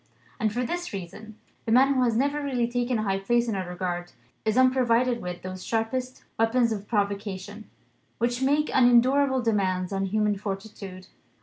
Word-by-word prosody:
And 215 - +1
for 245 +4 -1
this 350 +3 -4
reason: 205 +4 -8 0.3
the 225 - -2
man 265 +4 +5
who 260 - +1
has 235 -3 +2
never 285 +3 +1
really 255 -4 0
taken 245 0 -1
a 215 - -1
high 195 -2 0
place 240 +4 +1
in 225 - -1
our 190 -2 -3
regard 175 -1 -4 0.3
is 220 +2 +1
unprovided 255 -2 +3
with 180 -1 -6
those 185 0 -6
sharpest 250 +3 -2 0.2
weapons 230 +1 +3
of 205 -2 -4
provocation, 205 -1 -3 0.5
which 240 +2 -1
make 290 +3 +2
unendurable 260 +2 +4
demands 190 -4 0
on 195 0 0
human 210 +1 +1
fortitude. 195 -2 -7
225 Hz, 170 wpm, -26 LUFS, 195-250 Hz, 0.5 s, man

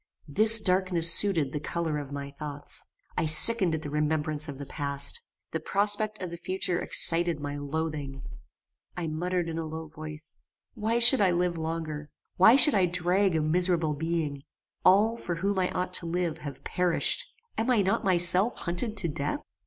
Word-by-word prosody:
This 215 +9 +4
darkness 185 -4 +2
suited 165 -9 +1
the 150 - -3
colour 160 0 -3
of 145 -1 -9
my 140 0 -7
thoughts. 145 0 -3 0.3
I 165 - -1
sickened 175 +3 +6
at 160 - -7
the 145 - -6
remembrance 150 0 -1
of 140 - -8
the 140 - -8
past. 140 - -2 0.3
The - - -3
prospect 210 +1 0
of 180 - -6
the 170 - -7
future 180 0 -1
excited 170 -1 +1
my 145 0 -6
loathing. 145 -2 -5 0.7
I 175 - -4
muttered 175 +2 -3
in 165 0 -5
a 165 - -4
low 160 +1 -7
voice, 155 0 -4 0.3
Why 225 0 -2
should 240 +1 +8
I 195 - +3
live 175 0 -1
longer? 160 -2 -5 0.3
Why 220 +7 +6
should 290 +2 +8
I 190 -3 +2
drag 180 +2 +1
a 160 - 0
miserable 165 0 +1
being? 155 -2 -3 0.4
All, 210 +5 +3
for 175 -6 -5
whom 195 +3 -2
I 180 - 0
ought 180 0 -4
to 170 - -8
live, 170 -1 -3
have 145 -3 -9
perished. 180 -2 0 0.3
Am 225 +3 -2
I 230 -5 +3
not 190 - -1
myself 185 +4 +2
hunted 210 +6 -4
to 190 -4 -2
death? 150 - -4
170 Hz, 175 wpm, -27 LUFS, 155-190 Hz, 0.7 s, should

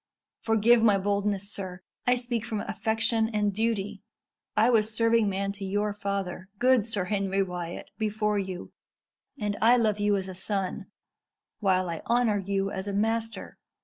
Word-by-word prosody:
Forgive 225 +1 +4
my 210 -3 +5
boldness, 200 0 -1
sir. 185 -2 -6 0.2
I 250 - +5
speak 240 -2 -2
from 220 -3 -3
affection 220 +1 0
and 210 -2 0
duty. 210 -2 -1 0.6
I 225 +3 +5
was 220 -2 +3
serving 230 -1 +3
man 195 +1 -1
to 200 0 -8
your 205 +2 0
father, 195 -2 -4
good 250 -2 +4
Sir 210 -4 -1
Henry 195 0 0
Wyat, 175 -2 -6
before 210 -1 0
you, 185 -2 -5 0.7
and 205 -2 -1
I 235 +3 +6
love 215 -3 +1
you 205 0 +3
as 190 -1 -3
a 190 - -6
son, 190 0 -3 0.7
while 185 -3 +2
I 165 -2 -4
honour 235 -3 +3
you 195 0 -1
as 190 +1 -4
a 200 - -2
master. 225 +2 -2
205 Hz, 160 wpm, -28 LUFS, 195-225 Hz, 0.7 s, I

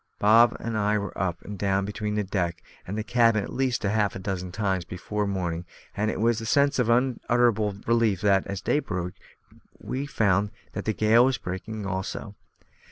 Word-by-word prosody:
Bob 115 +3 +5
and 115 -1 -4
I 105 +1 +2
were 100 -2 -4
up 90 -2 -2
and 100 -2 -8
down 95 0 +1
between 105 +1 -3
the 105 - +1
deck 85 -3 -2 0.2
and 100 +4 -4
the 110 - -1
cabin 115 -2 +3
at - - -7
least 130 -2 0
half 105 -1 +1
a - - -5
dozen 95 -2 -4
times 95 -2 -1
before 100 +4 -3
morning, 90 -4 -2 0.3
and 105 +1 0
it - - -3
was 115 +1 +2
with 115 - -5
a - - -2
sense 140 -2 +3
of 120 -2 +2
unutterable 120 -3 +2
relief 115 -5 +2
that, 100 -1 +3
as 100 -1 -4
day 145 - +1
broke, 90 -8 -4 0.7
we 135 +2 -4
found 100 -5 +2 0.2
that - - -5
the 110 - +1
gale 110 +4 +5
was 130 -2 +1
breaking 100 +3 -5
also. 95 +2 -4
105 Hz, 195 wpm, -26 LUFS, 95-115 Hz, 0.7 s, Bob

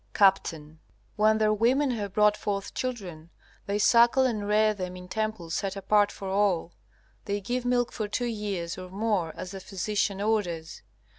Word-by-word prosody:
Capt. 195 -2 +4 0.6
When 215 0 +4
their 215 -1 +3
women 255 +6 +2
have 205 -5 -3
brought 210 0 +4
forth 200 -1 -3
children, 185 -11 -5 0.4
they 200 +1 0
suckle 235 +4 +5
and 215 -5 -1
rear 215 +1 +3
them 185 -3 -5
in 180 0 -10
temples 215 -5 -3
set 195 +2 -2
apart 205 +1 +2
for 195 - -8
all. 190 -3 +1 0.5
They 200 0 -1
give 245 +5 -3
milk 245 -1 +1
for 215 - -3
two 215 +4 -2
years 200 -7 -3
or 185 0 -8
more 195 -4 -1
as 180 - -7
the 195 - -7
physician 200 +1 -2
orders. 190 -7 -2
205 Hz, 165 wpm, -27 LUFS, 190-220 Hz, 0.6 s, suckle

